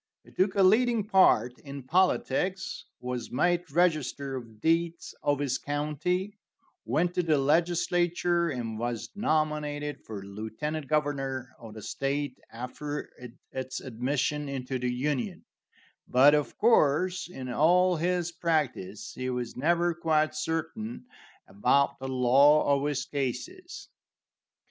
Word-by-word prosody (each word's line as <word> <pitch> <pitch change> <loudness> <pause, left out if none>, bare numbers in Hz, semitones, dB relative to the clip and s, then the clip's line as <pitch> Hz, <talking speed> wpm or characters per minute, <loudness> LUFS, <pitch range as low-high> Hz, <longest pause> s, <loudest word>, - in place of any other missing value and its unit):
He - - -18
took 190 +1 +1
a 195 - +4
leading 225 +3 +4
part 125 - +4
in 140 -1 -8
politics, 185 +3 0 0.2
was 125 -2 -4
made 175 +6 +1
register 145 -5 +1
of 115 -4 -9
deeds 165 +4 0
of 145 0 +1
his 140 -2 -1
county, 155 +8 -2 0.5
went 160 +9 +1
to 180 - +1
the 160 -3 +2
legislature, 175 +3 +2
and 115 -5 -4
was 120 -1 -3
nominated 150 -5 -1
for 105 -3 -7
lieutenant 110 +10 -5
governor 135 -4 -1
of 110 -2 -11
the 110 - -9
state 140 -1 -2
after 135 +5 -6 0.4
its 130 0 -4
admission 140 +4 -2
into 130 -1 -3
the 125 0 -1
Union; 145 +7 -2 0.6
but, 135 +4 +6
of 150 -1 0
course, 185 -4 +3
in 130 -7 -7
all 180 +7 +4
his 175 +1 0
practice 135 - -2
he 130 0 -4
was 125 -2 -3
never 170 +5 +2
quite 160 -2 +1
certain 165 +11 -4 0.4
about 125 +8 +2
the 135 - -5
law 140 +3 +5
of 140 +1 -1
his 145 -3 -1
cases. 345 - -5
145 Hz, 125 wpm, -28 LUFS, 130-175 Hz, 0.6 s, but